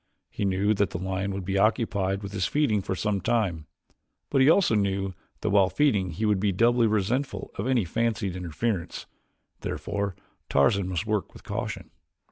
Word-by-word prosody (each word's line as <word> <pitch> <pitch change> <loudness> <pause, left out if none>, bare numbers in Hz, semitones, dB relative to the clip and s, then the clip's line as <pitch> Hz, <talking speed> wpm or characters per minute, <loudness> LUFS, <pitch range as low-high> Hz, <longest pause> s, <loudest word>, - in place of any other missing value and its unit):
He 100 - -2
knew 100 +2 +2
that 100 -1 +1
the - - -4
lion 95 +2 -2
would 95 -1 -4
be 95 +1 0
occupied 100 -3 +1
with 100 - -6
his 95 -4 0
feeding 130 -9 +1
for 95 - -3
some 100 0 -1
time, 95 -8 0 0.6
but 135 - +3
he 135 - +6
also 175 - +4
knew 100 -2 0 0.3
that 105 - 0
while 100 -2 +5
feeding 105 -11 +2
he 95 +7 -2
would 105 -2 +2
be 100 +1 +1
doubly 115 +4 +3
resentful 110 +1 -1
of 100 - -3
any 125 -6 +2
fancied 110 0 -1
interference. 90 +2 -3 0.5
Therefore 100 -2 -3 0.3
Tarzan 90 +8 +3
must 95 +2 -2
work 105 -2 -1
with - - -13
caution. - - -5
100 Hz, 175 wpm, -26 LUFS, 95-110 Hz, 0.6 s, he